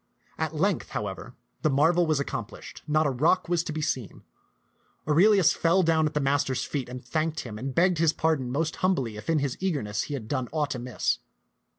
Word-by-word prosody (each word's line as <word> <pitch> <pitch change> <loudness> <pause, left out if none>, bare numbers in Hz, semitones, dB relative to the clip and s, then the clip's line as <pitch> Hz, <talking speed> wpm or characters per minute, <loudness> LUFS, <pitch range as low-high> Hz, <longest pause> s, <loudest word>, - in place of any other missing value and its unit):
At - - -2
length, - - 0
however, - - -6 0.3
the 155 - +2
marvel 160 +5 +3
was 155 -2 +2
accomplished, 140 - -6
not 155 +1 +2
a 140 - +2
rock 160 +9 +2
was 170 -1 +1
to - - -3
be 155 0 -3
seen. 125 -8 -3 0.8
Aurelius 185 +4 +5
fell 175 +3 +2
down 160 -2 +3
at 150 - -6
the - - +2
master's 135 -2 +1
feet 135 -4 -4
and 125 -1 -8
thanked 155 +4 -1
him, 110 -3 -8
and 130 +2 -5
begged 175 0 +3
his 165 -2 +4
pardon 155 -7 0
most 155 +4 -1
humbly 135 - 0
if 105 +6 -8
in 165 - +3
his 140 -3 -1
eagerness 135 - -1
he 145 - -4
had 115 -6 -7
done 130 -1 -2
aught 150 -2 -1
amiss. 125 0 -1
150 Hz, 200 wpm, -27 LUFS, 130-165 Hz, 0.8 s, Aurelius